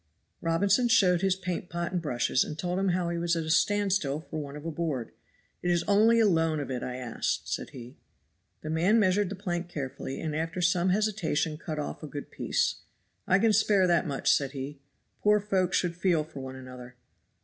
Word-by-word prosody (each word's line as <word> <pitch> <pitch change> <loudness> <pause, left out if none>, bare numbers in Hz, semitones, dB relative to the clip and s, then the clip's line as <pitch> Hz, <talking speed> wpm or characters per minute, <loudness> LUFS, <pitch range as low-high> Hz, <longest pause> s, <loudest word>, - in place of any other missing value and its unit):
Robinson 195 +8 +2
showed 180 -6 +4
his 190 -1 +2
paintpot 175 -1 -4
and 180 -1 -1
brushes, 125 -4 +1
and 150 - -7
told 180 +3 -2
him 195 - +1
how 175 -1 0
he 170 0 -2
was 170 0 +1
at 165 - -1
a 160 - -2
stand 205 +2 +2
still 145 -7 0
for 155 -1 -6
want 145 0 -7
of 150 - -10
a 165 - -2
board. 150 -7 -3 0.5
"It 175 - -1
is 175 -1 +2
only 220 +3 +4
a 225 - +5
loan 165 -5 +2
of 140 -2 -4
it 125 - -3
I 125 - -4
ask," 125 -3 -2
said - - -4
he. 125 0 -11 0.6
The 155 - -5
man 175 +8 +3
measured 200 -1 +2
the 200 - -5
plank 175 -3 -3
carefully, 135 -3 -5
and 155 -2 -3
after 165 +3 -2
some 180 +1 +2
hesitation 185 -6 0
cut 155 0 -6
off 150 - -4
a 155 - -6
good 145 0 -7
piece. - - 0 0.5
"I 190 - +5
can 220 +2 +3
spare 205 -3 +4
that 170 -3 +2
much," 140 -2 +2
said 140 -1 0
he; 140 +1 -6 0.4
"poor 210 0 +4
folk 190 -3 0
should 175 -2 0
feel 170 -3 +2
for 150 -2 -10
one 130 0 -7
another." 125 -1 -10
170 Hz, 210 wpm, -28 LUFS, 150-190 Hz, 0.6 s, a